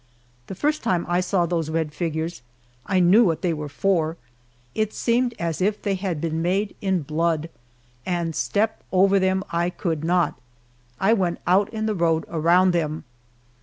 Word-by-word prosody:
The 195 - -6
first 300 +9 0
time 180 -6 0
I 175 +1 +1
saw 180 -1 +1
those 165 -2 -1
red 160 -1 -2
figures 165 -1 -3 0.5
I 190 -1 +2
knew 185 +6 +6
what 170 -5 0
they 175 -2 +1
were 150 -1 -5
for 165 0 0 0.6
it 215 +4 -1
seemed 240 0 +1
as 170 0 -3
if 205 +2 +1
they 200 - -1
had 185 -4 -2
been 160 0 -2
made 195 +4 0
in 190 -4 0
blood, 160 +2 -1 0.5
and 170 -3 -2
step 200 - 0
over 195 +1 +4
them 190 0 +1
I 170 0 +1
could 165 -4 -3
not. 175 +1 +2 0.7
I 200 +4 +4
went 185 -6 0
out 195 +4 +3
in 220 -1 -3
the 215 - 0
road 165 -3 +1
around 170 +3 +3
them. 155 -3 -1
175 Hz, 170 wpm, -23 LUFS, 165-195 Hz, 0.7 s, knew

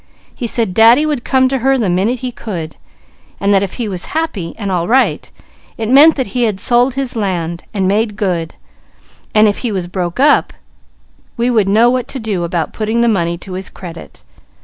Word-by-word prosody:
He 240 - -4
said 225 -5 0
'Daddy' 230 +8 +5
would 295 -6 -2
come 260 -1 +2
to 265 0 -1
her 270 +2 +2
the 225 -5 0
minute 195 +8 0
he 255 -1 -3
could, 175 -9 -6 0.6
and 200 +1 +2
then 195 - +4
if 195 -2 -3
he 235 -3 -3
was 185 -3 -4
happy 220 - -3
and 200 -3 -4
all 175 -2 -1
right, 260 +5 +1 0.5
it 225 - -3
meant 295 +5 +7
that 260 - -1
he 250 - 0
had 210 -4 -2
sold 245 +2 +2
his 270 -3 -2
land 175 -5 -2
and 195 -3 -1
made 210 +2 0
good; 180 -6 -2 0.8
and 215 0 +6
if 205 - 0
he 240 - -2
was 190 -3 -2
broke 175 +2 -4
up, 290 +2 +3 0.8
we 240 +1 +1
would 215 -5 +2
know 225 +4 +4
what 255 -1 -1
to 270 - -5
do 210 -6 -2
about 170 -2 -2
putting 220 +2 -1
the 235 - +3
money 170 -6 0
to 185 +2 -10
his 185 +1 -5
credit. 170 -3 -11
215 Hz, 205 wpm, -15 LUFS, 185-245 Hz, 0.8 s, meant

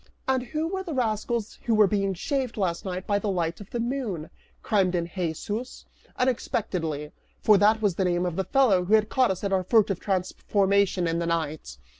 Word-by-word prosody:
"And 260 -1 +2
who 310 +6 -3
were 380 +2 -3
the 340 -6 -5
rascals 225 -2 -1
who 230 - +2
were 215 -1 +6
being 195 -1 0
shaved 260 - -2
last 180 -3 -1
night 185 0 -4
by 205 -1 +1
the 205 - -2
light 170 -1 -1
of 200 - -11
the 240 - -3
moon?" 230 - -3 0.4
chimed 190 -4 +2
in 170 -1 0
Hesus, 190 +7 -4 0.3
unexpectedly, 180 - -1 0.3
for 215 - +6
that 215 +2 +4
was 200 -3 +3
the 190 +2 0
name 175 0 +1
of 175 -2 -2
the 190 - 0
fellow 205 -9 +3
who 210 +4 +4
had 215 0 +2
caught 255 -2 +3
us 190 0 -3
at 200 -1 0
our 190 -1 +2
furtive 195 -1 +3
transformation 195 0 +1
in 165 0 0
the 170 - -1
night. 155 - -3
200 Hz, 200 wpm, -26 LUFS, 180-225 Hz, 0.4 s, were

